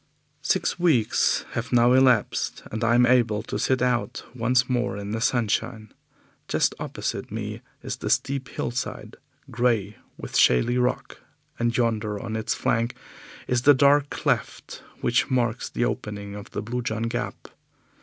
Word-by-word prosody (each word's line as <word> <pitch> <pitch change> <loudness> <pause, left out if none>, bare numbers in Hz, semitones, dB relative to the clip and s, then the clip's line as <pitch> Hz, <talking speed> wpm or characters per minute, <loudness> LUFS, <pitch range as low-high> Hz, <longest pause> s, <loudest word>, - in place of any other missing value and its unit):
Six - - 0
weeks 145 -11 +2
have 120 +1 -4
now 120 0 +5
elapsed, 130 -4 +2
and 110 +2 -3
I 115 +1 +3
am 125 0 +5
able 120 -4 +2
to - - -4
sit 130 -1 +1
out 125 -1 -1
once 125 +1 +2
more 120 -5 -1
in 100 0 -5
the 110 +1 -2
sunshine. 110 -2 -1 0.5
Just - - +1
opposite - - -4
me - - -5 0.2
is - - -4
the - - -4
steep 135 -1 0
hillside, 120 +1 -4 0.3
grey 115 -4 0 0.2
with - - -8
shaly 120 - +4
rock, 125 +1 -1 0.4
and 120 0 0
yonder 110 -3 0
on 110 0 -5
its 110 - -1
flank 115 +1 0 0.5
is 125 -1 +1
the 145 +2 +6
dark 145 +1 +4
cleft - - -2 0.2
which - - +1
marks 120 -2 0
the 120 - -1
opening 100 -5 -4
of 100 0 -9
the - - -5
Blue 120 +3 -3
John 110 -2 -3
Gap. 115 - -4
120 Hz, 155 wpm, -25 LUFS, 110-125 Hz, 0.5 s, the